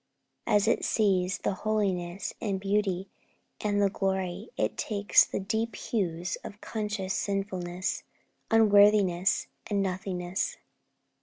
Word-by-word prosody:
As 210 -1 +3
it 230 - +2
sees 185 -4 +2
the - - -1
holiness, 195 -4 -1
the 205 -3 -1
beauty, 195 -1 0 0.6
and 205 -1 +1
the 200 -1 +3
glory, 190 - -2
it - - 0
takes 205 -2 +4
the - - -3
deep 220 +2 -2
hues 180 -5 -2
of 205 - -9
conscious 210 -4 -3
sinfulness, 185 -2 -2 0.5
unworthiness, 205 -4 +5 0.2
and 200 -2 +1
nothingness. 185 -1 -2
195 Hz, 110 wpm, -28 LUFS, 185-210 Hz, 0.6 s, unworthiness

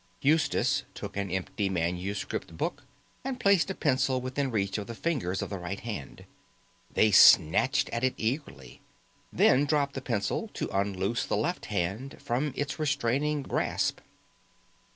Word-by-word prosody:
Eustace 145 -2 +2
took 100 -1 -7
an 100 -1 -2
empty 95 +2 -2
manuscript 90 0 -3
book - - -2 0.4
and 260 -1 -4
placed 200 -4 +3
a 190 - -3
pencil 130 -3 +1
within 130 +2 -2
reach 100 -3 -1
of 100 - -6
the 115 - -6
fingers 110 - -1
of - - -6
the 100 - -4
right 90 +3 -5
hand. 105 - -7 0.7
They 110 - +3
snatched 80 -4 +6
at 115 +1 -3
it 130 - +1
eagerly; 115 - -4 0.5
then 140 +3 +4
dropped 145 -1 +1
the 135 - -5
pencil 100 -5 -2
to - - -4
unloose 100 +3 0
the - - 0
left - - -2
hand 100 +11 -3
from 135 +5 -1
its 145 +2 -3
restraining 145 0 0
grasp. - - -1
120 Hz, 150 wpm, -28 LUFS, 100-145 Hz, 0.7 s, snatched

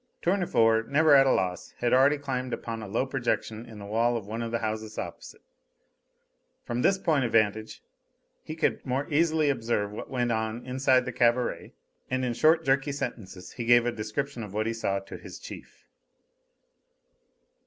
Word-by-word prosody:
Tournefort, 115 - +2
never 150 +2 +4
at 135 -1 +7
a - - +4
loss, 90 -1 -2
had 120 -1 0
already 135 +3 +5
climbed 130 -3 -3
upon 115 -1 -5
a 105 - -7
low 115 +6 0
projection 120 -3 -2
in 110 -2 -11
the 100 - -9
wall 115 +3 +1
of 110 - -7
one 110 +3 -5
of 115 - -3
the 115 - -1
houses 110 -1 -4
opposite. - - -8 1.2
From 120 +1 -3
this 195 - +3
point 160 -7 +1
of 120 - -2
vantage 110 0 +1 0.6
he 155 - -7
could 160 - 0
more 135 +2 -1
easily 155 -1 +3
observe 115 -5 -1
what 105 - -7
went 125 -2 0
on 110 +2 -2
inside 130 0 +2
the 125 - -3
cabaret, 120 +1 0 0.3
and 130 0 -1
in 120 - -1
short, 160 +6 +3
jerky 135 +1 +2
sentences 95 -9 -6
he 120 - -6
gave 120 0 +5
a 120 - +1
description 120 +4 -4
of 105 -2 -8
what 110 +1 0
he 115 - -1
saw 100 -3 -1
to 95 0 -8
his - - -10
chief. - - -12
120 Hz, 180 wpm, -27 LUFS, 110-135 Hz, 1.2 s, at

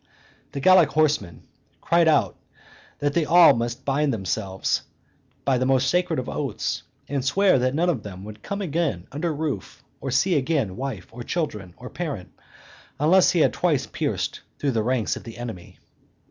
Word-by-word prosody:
The 140 - -3
Gallic 180 +1 +6
horsemen 150 - 0 0.4
cried 170 0 +3
out 155 - +3 0.6
that 145 0 -1
they 170 - +2
must 120 -8 +5
all - - -30
bind 140 +1 +1
themselves 95 -2 -1 0.6
by 130 -3 +2
the 130 - +1
most 130 0 +3
sacred 180 -2 +1
of 125 - -3
oaths, 135 -8 -3 0.3
and 140 -2 -2
swear 185 +3 +3
that 130 +2 0
none 170 +3 +2
of 155 -10 0
them 95 -2 -9
would 105 +1 -10
come 200 - -4
again 165 -2 -1
under 160 +4 -2
roof, 145 -9 -4 0.2
or 135 - -4
see 135 +9 +2
again 135 - 0
wife, 130 -7 -5
or 120 +2 -9
children, 105 - -3
or 125 - -9
parent, 145 - -5 0.7
unless 175 +6 +5
he 170 - +2
had - - +3
twice 160 -7 +1
pierced - - -3 0.2
through 140 - 0
the 115 -3 0
ranks 120 0 0
of - - -9
the 115 0 -10
enemy. 115 -8 -8
135 Hz, 175 wpm, -24 LUFS, 115-160 Hz, 0.7 s, Gallic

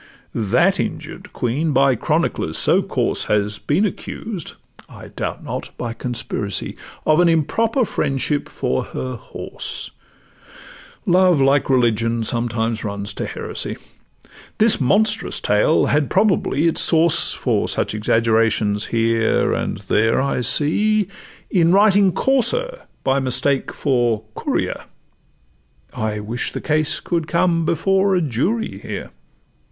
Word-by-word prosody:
That 105 -4 +2
injured - - -5
Queen 145 +6 -1
by 135 0 +4
chroniclers - - -1
so - - +3
coarse - - -2
Has 105 0 0
been 170 +9 +1
accused 200 -3 -6 0.4
(I - - -12
doubt - - -5
not - - -5
by 120 -2 -4
conspiracy) 115 -4 -4 0.3
Of 155 +1 +3
an 175 -1 +5
improper 225 - +1
friendship 145 -3 -2
for 65 - -2
her 130 0 -5
horse 115 - -7 1.1
(Love, 180 -3 +4
like 135 +1 +2
religion, 115 -2 +1
sometimes 115 -1 -1
runs 100 -1 -4
to - - -4
heresy): - - -4 0.8
This 220 -7 +3
monstrous 210 - +1
tale 105 +10 +2
had 145 -1 +1
probably 185 -6 +1
its 165 - +3
source 165 0 +5
(For - - 0
such - - -1
exaggerations 110 -1 +1
here 115 -1 +1
and - - -2
there 110 +1 +1
I 135 -1 0
see) 205 - +2 0.4
In 170 -3 +3
writing 200 0 +5
'Courser' 485 - 0 0.2
by 135 +1 +2
mistake 130 +1 +1
for 120 -6 0
'Courier:' - - -3 1.1
I 110 -1 -3
wish 115 +3 -4
the - - -4
case 155 -1 0
could 170 -3 -2
come 170 -1 +1
before 195 +4 +2
a 180 - +2
jury 170 - -2
here. - - -7
140 Hz, 125 wpm, -20 LUFS, 115-180 Hz, 1.1 s, an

